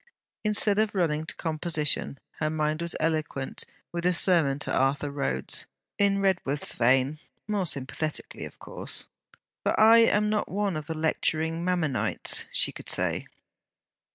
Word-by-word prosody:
Instead 210 -1 +3
of 215 -1 +1
running 160 -4 0
to - - -2
composition, 155 -3 0 0.2
her 155 - 0
mind 155 0 -1
was 170 0 0
eloquent 155 -4 -2 0.3
with 170 0 -4
a 180 0 +3
sermon 165 -7 +4
to 145 - -3
Arthur 140 +2 +1
Rhodes, 135 - -2 0.3
in 200 -1 +3
Redworth's 170 -7 0
vein; 130 +5 +2 0.3
more 205 -4 -1
sympathetically, 150 +2 -3
of - - -11
course. - - -5 0.6
'For - - 0
I 225 +2 +8
am 210 -2 +4
not 210 0 0
one 200 -2 -1
of 155 -1 -5
the 160 -1 -4
lecturing 160 +1 0
Mammonites!' 175 -7 +1
she - - +2
could - - -10
say. - - 0
160 Hz, 145 wpm, -27 LUFS, 150-190 Hz, 0.6 s, I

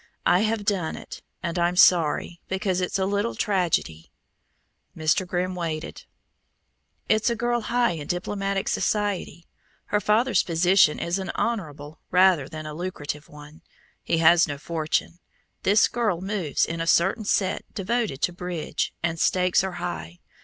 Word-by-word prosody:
I 180 - +4
have 215 0 0
done 190 -6 0
it, - - -10 0.2
and 170 0 -2
I'm 175 +1 +1
sorry, 175 -1 +3
because 190 -1 -1
it's 180 - -1
a 190 - 0
little 205 +4 -1
tragedy." 170 - -1 0.9
Mr. 170 +4 +1
Grimm 180 +1 -1
waited. 165 -3 -5 1.0
"It's 220 +3 +2
a 235 - 0
girl 240 +1 0
high 240 +2 +1
in 155 -4 -6
diplomatic 195 +2 -2
society. 205 -5 -1 0.5
Her 210 - +3
father's 230 +5 +3
position 175 -1 +3
is 175 +3 -2
an 190 - -5
honorable 155 -9 -3
rather 180 -6 +4
than 155 0 -7
a 155 - -6
lucrative 150 -3 -5
one; 150 +1 -13 0.4
he - - 0
has 165 +1 +5
no 145 -2 -4
fortune. 160 +2 -2 0.4
This 205 +3 +4
girl 220 -8 -1
moves 190 -5 -1
in 165 0 -4
a 165 - -3
certain 190 +7 +3
set 190 -2 0
devoted 210 - -2
to 180 - +1
bridge, 175 -2 -3
and 165 -1 -1
stakes 180 +1 +2
are 190 -1 -3
high. 85 - -5
180 Hz, 150 wpm, -25 LUFS, 160-200 Hz, 1.0 s, has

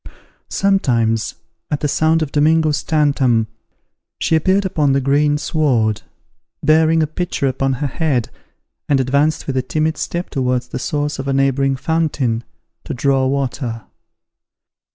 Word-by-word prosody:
Sometimes 120 - +1 0.3
at 150 - -2
the 150 - +1
sound 160 +2 +2
of 145 - -5
Domingo's 155 0 +2
tantam 140 -7 +2 0.7
she 160 - +1
appeared 190 +5 +2
upon 150 -7 +1
the 140 - +3
green 145 +2 +2
sward, 120 -9 0 0.6
bearing 160 +1 +4
a - - +2
pitcher 160 -1 -3
upon 135 +1 0
her 130 +3 -3
head, 140 -4 -1 0.6
and 140 -2 +3
advanced 140 +4 +1
with 135 -2 -2
a - - +2
timid 155 +3 -1
step 175 +1 -4
towards 125 -2 -1
the - - -4
source 145 +1 -2
of 135 - -4
a 135 - 0
neighbouring 135 0 +2
fountain, 135 -6 -1 0.4
to - - -5
draw 135 +1 +2
water. 130 -4 -2
140 Hz, 140 wpm, -18 LUFS, 130-155 Hz, 0.7 s, bearing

